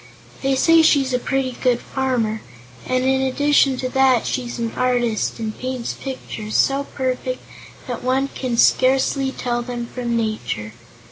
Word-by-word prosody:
They 270 0 +1
say 330 +5 +5
she's 280 -4 +3
a 250 - +2
pretty 270 0 -1
good 245 -2 +2
farmer, 245 -5 -1 0.5
and 255 0 +1
in 265 0 +2
addition 275 0 +3
to 255 0 -2
that 265 -3 +3
she's 245 -2 -3
an 230 -1 -2
artist, 245 -4 0
and 220 -2 -4
paints 255 -2 -4
pictures 220 -5 -6
so 275 +1 +2
perfect 255 -1 -3 0.4
that 245 -2 -5
one 265 +2 +1
can 250 -4 -3
scarcely 265 +2 +3
tell 240 -2 -2
them 240 -1 -4
from 240 -1 -3
nature. 215 - -3
255 Hz, 150 wpm, -21 LUFS, 240-265 Hz, 0.5 s, say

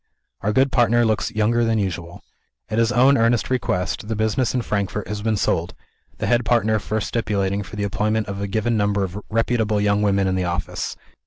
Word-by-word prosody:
Our 105 - 0
good 135 +4 +3
partner 120 -1 +3
looks 110 +1 0
younger 115 +1 +1
than 115 -1 +1
usual. 85 -4 -4 0.5
At 110 - 0
his 115 0 +3
own 130 +3 +4
earnest 115 +2 +2
request, 100 -6 -1
the 110 - -2
business 110 +3 0
in 125 - 0
Frankfort 105 -1 -2
has 105 -1 -4
been 110 0 0
sold; 85 -3 -1 0.4
the - - -3
head 120 0 +2
partner 110 -1 +2
first 110 +1 -2
stipulating 100 -3 -1
for 100 +2 -9
the 105 - -2
employment 105 +2 0
of 100 0 -5
a 100 - -2
given 110 +3 0
number 100 -1 +1
of 95 +2 -5
reputable 110 -1 +1
young 105 0 +2
women 100 -1 +2
in 95 - +1
the 95 0 0
office. 85 0 -3
105 Hz, 200 wpm, -22 LUFS, 100-115 Hz, 0.5 s, own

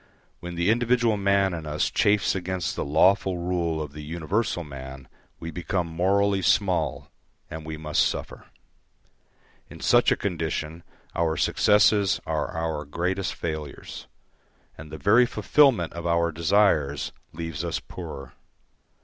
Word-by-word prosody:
When 90 0 -7
the 85 +5 +2
individual 120 -1 +2
man 100 -1 +2
in 80 -2 -6
us 75 0 -1
chafes 100 -1 +2
against 95 -1 -3
the - - -2
lawful 95 +5 +3
rule 85 -2 -1
of 75 -2 -5
the 75 - -8
universal 85 +5 -2
man 65 -2 -9 0.3
we 85 - -6
become 90 0 -2
morally 95 +4 +1
small, 90 - +1 0.4
and 80 0 -6
we 80 0 -5
must 75 -1 +1
suffer. - - -6 1.2
In - - -12
such - - +4
a - - +4
condition 80 -3 -3 0.3
our 80 -2 0
successes 105 -2 +3
are - - -1
our 80 -2 -3
greatest 90 +5 -2
failures, 80 -3 -6 0.7
and 80 -1 -11
the 80 - -6
very 110 +8 +4
fulfilment 125 - +3
of 85 0 -5
our 85 0 +2
desires 80 -4 +2 0.2
leaves 80 -1 -5
us 85 0 -2
poorer. 75 -9 -9
85 Hz, 135 wpm, -25 LUFS, 80-100 Hz, 1.2 s, such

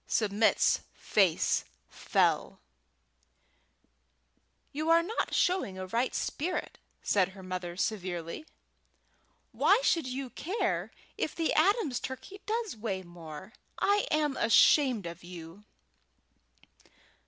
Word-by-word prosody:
Submit's 215 0 +2 0.2
face 190 -6 +2 0.2
fell. - - 0 2.1
"You 310 +3 -2
are 335 0 +6
not 435 +7 -2
showing 360 - +1
a 185 - -5
right 235 +7 -1
spirit," 355 +5 -3 0.2
said 190 -3 +2
her 190 0 -12
mother, 180 -1 -5
severely. 185 - -3 1.0
"Why - - +4
should 330 - +2
you 255 0 -5
care 385 +8 -2 0.3
if - - -2
the 330 -1 0
Adams' 320 - +2
turkey 380 +10 -8
does 445 - -2
weigh 205 -4 -4
more? 175 +2 -10 0.2
I 405 +1 +2
am 300 -2 +1
ashamed 240 - +4
of 170 0 -8
you!" 175 +3 -11
230 Hz, 105 wpm, -30 LUFS, -, 2.1 s, are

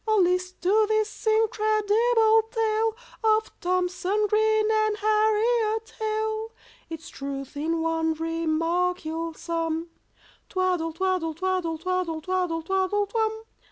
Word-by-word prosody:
Oh, 435 0 +3
list 365 0 +1
to 425 +4 +4
this 435 0 -1
incredible 440 +1 +3
tale 445 -1 0 0.3
Of 435 0 +2
THOMSON 365 +3 0
GREEN 435 +1 +3
and 430 -1 +1
HARRIET 435 +1 +1
HALE, 435 0 -2 0.4
Its 325 -1 -7
truth 275 0 -6
in 325 +3 -1
one 325 -1 0
remark 330 +2 -1
you'll 325 +1 -4
sum— 330 0 -3 0.6
"Twaddle 365 -4 0
twaddle 360 -2 -1
twaddle 365 -2 -1
twaddle 360 -1 -2
twaddle 355 -1 -1
twaddle 385 +3 +1
twum!" 440 +1 -1
375 Hz, 115 wpm, -26 LUFS, 330-435 Hz, 0.6 s, to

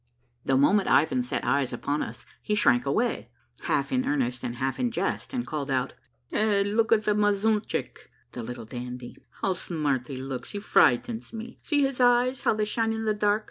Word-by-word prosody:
The 135 - +2
moment 195 +9 +4
Ivan 140 -3 +3
set 125 - -3
eyes 140 -2 +1
upon 140 +4 -2
us - - -6 0.2
he 210 - -1
shrank 130 - +3
away, 230 - 0 0.4
half - - 0
in 255 0 +1
earnest 125 -4 -1
and 120 - -3
half 130 +2 -2
in 250 -1 +1
jest, 230 - -2
and 250 -3 -2
called 145 -2 -4
out, 130 -2 0 0.2
— - - -24
''Hey, 210 -2 +2
look 225 0 +2
at' 220 -1 +4
the 210 - +3
mazuntchick! 210 +1 0 0.3
[Little 120 -1 -6
Dandy!] 125 +1 -7 0.3
How 190 - +2
smart 150 -8 -2
he 135 - -6
looks! 130 -1 -6
He 205 - -3
frightens 200 - +2
me! 230 +2 -8
See 290 -2 +1
his 270 -2 -1
eyes, 245 +1 +3
how - - +2
they 215 0 0
shine 225 +1 0
in 220 0 -3
the 215 - +2
dark 210 0 +2
195 Hz, 195 wpm, -27 LUFS, -, 0.4 s, moment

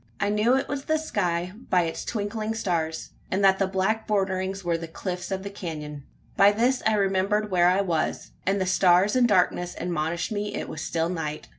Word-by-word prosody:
I 200 - +1
knew 210 +4 +3
it 270 - 0
was 275 -1 -4
the 315 - +2
sky 180 - -1 0.2
by 180 -1 +4
its 165 -1 -4
twinkling 215 +1 -3
stars; 165 -7 -2 0.2
and 190 +2 0
that 190 -1 +5
the 195 - +2
black 195 +4 0
borderings 195 -2 -1
were 170 -1 0
the 165 0 -5
cliffs 180 +2 -5
of 190 0 -3
the 200 - -6
canon. 150 -7 -7 0.3
By 200 +1 +6
this 245 +4 +1
I 220 - +3
remembered 200 +1 +1
where 175 -1 +4
I 185 +2 +3
was, 170 -5 -2
and 195 +1 +1
the 190 - 0
stars 185 +2 +4
and 250 -1 +5
darkness 180 -3 +1
admonished 170 +1 -2
me 205 -1 -3
it - - -4
was 155 - -6
still 165 +1 -1
night. 155 - -4
190 Hz, 200 wpm, -25 LUFS, 175-210 Hz, 0.3 s, By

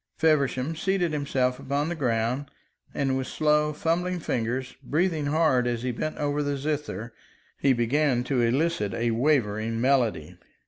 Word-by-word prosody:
Feversham 150 -2 +1
seated 180 -1 0
himself 130 -3 0
upon 140 +2 -1
the 175 - -2
ground, 125 -1 -1 0.4
and 135 -2 0
with 130 -1 -2
slow, 150 0 +2
fumbling 175 +4 -1
fingers, 125 -2 -2
breathing 155 +2 0
hard 145 -5 +2
as 120 -1 -2
he 125 - 0
bent 155 +6 -4
over 145 0 0
the 145 -1 -1
zither, 140 -5 -3 0.5
he 140 - +3
began 125 +1 +2
to 130 -1 0
elicit 120 - +1
a 115 0 0
wavering 115 -4 +1
melody. 120 - +1
140 Hz, 145 wpm, -26 LUFS, 120-150 Hz, 0.5 s, he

